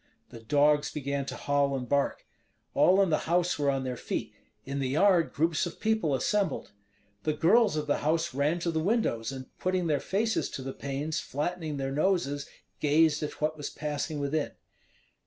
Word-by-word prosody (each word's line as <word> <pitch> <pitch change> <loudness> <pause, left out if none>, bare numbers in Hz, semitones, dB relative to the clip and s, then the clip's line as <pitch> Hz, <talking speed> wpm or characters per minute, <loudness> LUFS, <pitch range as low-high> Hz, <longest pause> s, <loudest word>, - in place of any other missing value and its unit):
The 115 - -10
dogs 145 +5 +3
began 140 -1 -3
to - - -4
howl 140 -1 +1
and 125 -2 -4
bark. 140 +2 0 0.5
All 190 +2 +5
in 185 - 0
the 155 - 0
house 175 -1 +2
were 145 -1 +2
on 135 -1 0
their 130 -1 -3
feet; - - -4 0.3
in 140 +1 -3
the 135 -2 -1
yard 170 +3 +3
groups 160 +2 +1
of 175 - -9
people 220 -10 +1
assembled. 200 - 0 0.5
The 155 - 0
girls 195 +5 +4
of 150 -1 -1
the 145 - 0
house 160 0 0
ran 145 +5 +1
to 170 - 0
the 160 - 0
windows, 160 - 0
and 130 -1 -9
putting 185 -1 0
their 150 -3 +1
faces 220 +7 0
to 135 - -5
the 135 0 -5
panes, 140 +3 -3
flattening 155 +1 -3
their 135 0 -2
noses, 145 -2 0 0.3
gazed 155 +1 +3
at 150 - -5
what 155 +1 +1
was 145 - -4
passing 150 0 -3
within. 145 +1 -1
150 Hz, 185 wpm, -29 LUFS, 140-170 Hz, 0.5 s, All